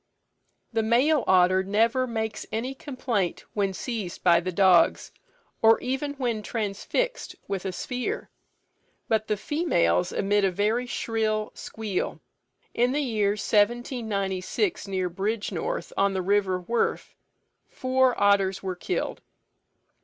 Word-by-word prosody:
The 225 - +2
male 250 +6 +3
otter 185 0 +5
never 225 +6 +1
makes 220 -2 -3
any 240 +5 -2
complaint 250 - -3
when 200 -2 0
seized 210 -2 -5
by 170 -2 +6
the 185 +2 -3
dogs, 185 -2 +4 0.5
or 225 0 +6
even 270 +3 -3
when 240 -5 -1
transfixed 225 - -2
with 195 -2 -3
a 190 - -1
spear, 250 +6 -4 0.8
but 220 -1 +1
the 210 - 0
females 210 - +1
emit 205 +1 +1
a 195 - +4
very 215 +6 0
shrill 220 -2 -1
squeal. 215 -4 -4 0.5
In 245 +2 +2
the 295 +1 +1
year 210 -5 +1
1796, 210 - 0
near 190 -2 -1
Bridgenorth, 220 - -3
on 195 0 +2
the 185 - -1
river 195 -1 +1
Wherfe, 230 +6 -1 0.6
four 260 -1 +1
otters 195 -2 +3
were 185 -1 -3
killed. 270 - -3
215 Hz, 125 wpm, -26 LUFS, 195-245 Hz, 0.8 s, by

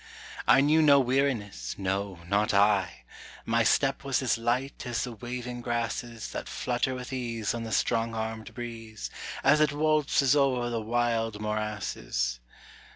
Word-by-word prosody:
I - - +7
knew 155 +3 +4
no 145 -2 +7
weariness, 125 - 0
no, 95 -1 -2
not 100 +2 +1
I 100 -1 +2 0.4
My 115 0 +2
step 135 +4 +2
was 135 -1 0
as 125 - +2
light 120 +4 -1
as 120 -1 -1
the 125 - -4
waving 120 +2 -6
grasses 120 -1 -3
That - - -5
flutter 125 +1 -1
with 125 +1 -7
ease 115 -4 -2
on 115 -1 -4
the 110 - -6
strong 115 +1 +1
armed 110 0 -5
breeze, 115 -3 -7 0.3
As 145 +3 +5
it 150 -2 +4
waltzes 150 -2 +2
over 130 -4 +2
the 115 -1 -1
wild 115 -1 0
morasses. 105 - -2
120 Hz, 150 wpm, -28 LUFS, 110-130 Hz, 0.4 s, I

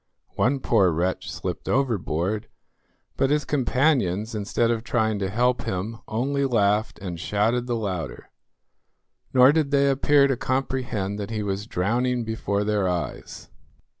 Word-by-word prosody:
One 135 +2 +2
poor 100 -8 +3
wretch 90 +3 -1
slipped - - -5
overboard, 105 - 0 0.7
but 135 - +2
his 150 +1 +1
companions, 125 - +1
instead 110 +2 0
of 115 -1 -2
trying 110 -3 0
to 95 -1 -1
help 125 +4 +1
him, 105 +5 -3
only 140 +5 -1
laughed 105 -4 +1
and 90 -3 -6
shouted 110 +7 0
the 120 - 0
louder, 95 -7 -4 1.0
nor 130 +1 +7
did 155 -2 +1
they 140 -1 +3
appear 140 +1 +4
to 135 -1 +1
comprehend 125 -6 -2
that 100 - -4
he 110 -2 -3
was 100 +1 -3
drowning 120 +6 0
before 110 -2 -2
their 105 -3 +1
eyes. 85 -3 -5
110 Hz, 140 wpm, -24 LUFS, 100-130 Hz, 1.0 s, nor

